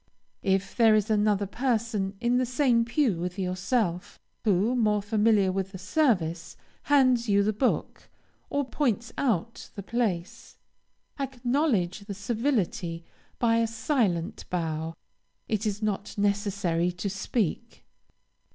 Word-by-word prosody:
If 195 0 0
there 225 -3 +5
is 215 +1 +1
another 210 -1 +2
person 220 -3 -1
in 245 +1 +2
the 255 - +1
same 245 -2 +2
pew 235 - +1
with 180 +2 -4
yourself, 185 0 -1 0.3
who, 210 +4 +2
more 210 -4 +2
familiar 210 -2 +3
with 195 +1 -3
the - - -5
service, 185 - 0 0.3
hands 255 -5 +4
you 200 0 +4
the 215 +2 +1
book, 250 +5 -1 0.4
or 285 0 0
points 240 -4 -1
out 230 -4 -1
the 200 - -6
place, 200 -6 -3 0.6
acknowledge 250 - 0
the 200 0 -7
civility 200 - -1 0.3
by 230 -1 +3
a 230 0 +2
silent 220 - -1
bow; 165 -2 -2 0.5
it 215 0 -1
is 210 +1 -3
not 205 -1 -2
necessary 200 -4 0
to 180 +3 -4
speak. 195 0 -3
210 Hz, 125 wpm, -27 LUFS, 190-235 Hz, 0.6 s, there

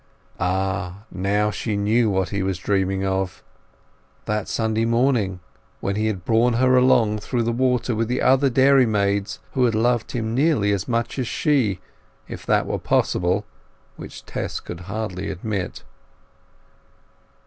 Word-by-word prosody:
Ah! 95 +1 -2
now 100 +3 0
she 105 0 -3
knew 110 +3 +2
what 95 -2 0
he 100 -1 -2
was 95 -1 -1
dreaming 95 0 0
of—that 95 +2 -6
Sunday 110 0 0
morning 115 -6 +1 0.4
when 100 - -2
he 110 +1 0
had 95 -5 -3
borne 115 +1 +3
her 130 +2 +4
along 120 -4 +4
through 120 +3 -2
the 115 - 0
water 125 0 +1
with 115 +1 -1
the 125 +2 -1
other 135 +1 +4
dairymaids, 110 -7 +3
who 130 - +1
had 115 -2 +1
loved 120 +1 +1
him 115 -2 -2
nearly 135 -6 +2
as 100 -1 -1
much 115 +2 -1
as 125 - -1
she, 115 - +1 0.5
if - - -9
that - - +2
were - - -2
possible, 90 +4 +1 0.5
which - - -10
Tess - - -4
could 85 - -8
hardly 100 -3 -4
admit. 100 -1 -4
110 Hz, 145 wpm, -22 LUFS, 95-120 Hz, 0.5 s, her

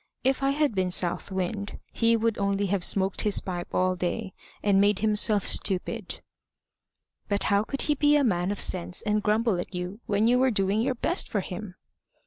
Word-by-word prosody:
If 265 +1 +1
I 275 - +2
had 290 -2 +1
been 185 -2 0
South 180 +2 -1
Wind, 195 +2 -3 0.2
he 230 0 +2
would 225 -1 -1
only 200 0 0
have 195 -1 -1
smoked 195 0 +2
his 210 -2 +1
pipe 175 -2 -5
all 185 0 +1
day, 185 +3 -3 0.3
and 200 -1 +4
made 205 0 +3
himself 210 -1 +3
stupid." 185 -2 0 1.1
"But 200 -1 0
how 200 +1 +3
could 275 +5 -2
he 300 - +1
be 295 +1 +3
a 290 - +3
man 180 -6 +1
of 205 - -4
sense 180 0 -3
and 210 0 0
grumble 215 -2 +1
at 180 - -6
you 180 +4 -5
when 205 +2 +2
you 245 +1 +3
were 260 0 +3
doing 200 -1 +1
your 255 +2 0
best 345 +9 0
for 205 - -1
him?" 185 +1 -7
205 Hz, 195 wpm, -26 LUFS, 190-230 Hz, 1.1 s, and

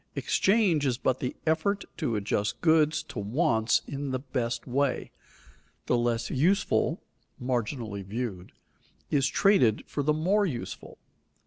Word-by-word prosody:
Exchange 190 -7 +2
is 125 -2 0
but 130 0 0
the 125 - -3
effort 170 +6 +1
to 145 -10 -1
adjust 105 0 -1
goods 155 -1 +3
to 155 - -7
wants 115 +1 +1
in 140 0 -4
the 130 - -1
best 125 -3 -3
way. 135 +1 -1 0.7
The - - +2
less 120 -1 0
useful 170 +9 +1 0.4
(marginally 120 -4 -2
viewed) 100 -3 -5 0.6
is 135 -2 +3
traded 135 - +3
for 145 - -3
the 150 +2 +2
more 190 +7 +2
useful. 125 -8 -6
130 Hz, 130 wpm, -28 LUFS, 115-160 Hz, 0.7 s, goods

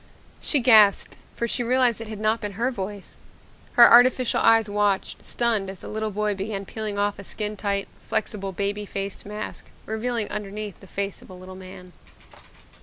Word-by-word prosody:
She 290 - 0
gasped 215 -5 +6 0.2
for 235 - -2
she 245 - 0
realized 245 -1 +2
it 225 - -6
had 215 -1 -7
not 215 +1 +1
been 205 -2 -5
her 235 +6 -1
voice. 200 -3 -6 0.5
Her 240 -1 +9
artificial 250 +1 +5
eyes 225 -1 +5
watched, 205 -1 -1
stunned, 225 -5 0
as 190 -1 -5
the - - -8
little 220 0 -3
boy 210 0 -1
began 195 0 -4
peeling 215 0 -4
off 205 0 0
a - - -7
skin 210 +2 -4
tight, 200 -1 -2
flexible 195 -2 -3
baby 200 +2 -3
faced 195 0 -6
mask, 210 +1 -6 0.2
revealing 220 0 -2
underneath 210 -1 -6
the 195 - -15
face 200 +1 -4
of - - -16
a 185 - -10
little 185 +1 -11
man. 185 -1 -12
210 Hz, 180 wpm, -24 LUFS, 200-225 Hz, 0.5 s, Her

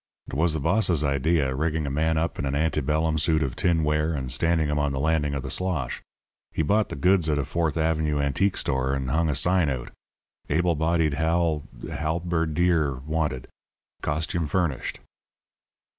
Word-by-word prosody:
"It - - -10
was 80 +4 +2
the - - -1
boss's 90 -1 +2
idea, 70 0 +1
rigging 80 +2 -1
a 70 - -3
man 80 +3 +1
up 85 +2 -1
in 70 - -1
an 70 - -1
ante 75 0 +1
bellum 80 +3 0
suit 80 0 +2
of 65 -3 -3
tinware 80 -2 +1
and 65 -3 -4
standing 80 +4 +1
him 75 0 0
on 75 -1 0
the 65 - -2
landing 75 -1 +1
of 70 - -3
the - - -5
slosh. 90 -4 -1 0.5
He 80 - -1
bought 105 +7 +2
the - - -5
goods 90 +3 +3
at 75 - +1
a 70 - -1
Fourth 85 -2 -1
Avenue 80 -2 +1
antique 70 +8 +1
store, 65 +1 0
and 65 -1 -3
hung 80 +1 +2
a 75 - 0
sign 90 +2 +2
out: 65 -3 -4 0.6
'Able 85 +4 +2
bodied 80 -1 +1
hal 80 0 +1 0.2
halberdier 80 -1 0
wanted. 75 -5 -2 0.5
Costume 80 +2 -1
furnished.' 80 -4 -1
80 Hz, 175 wpm, -25 LUFS, 70-85 Hz, 0.6 s, goods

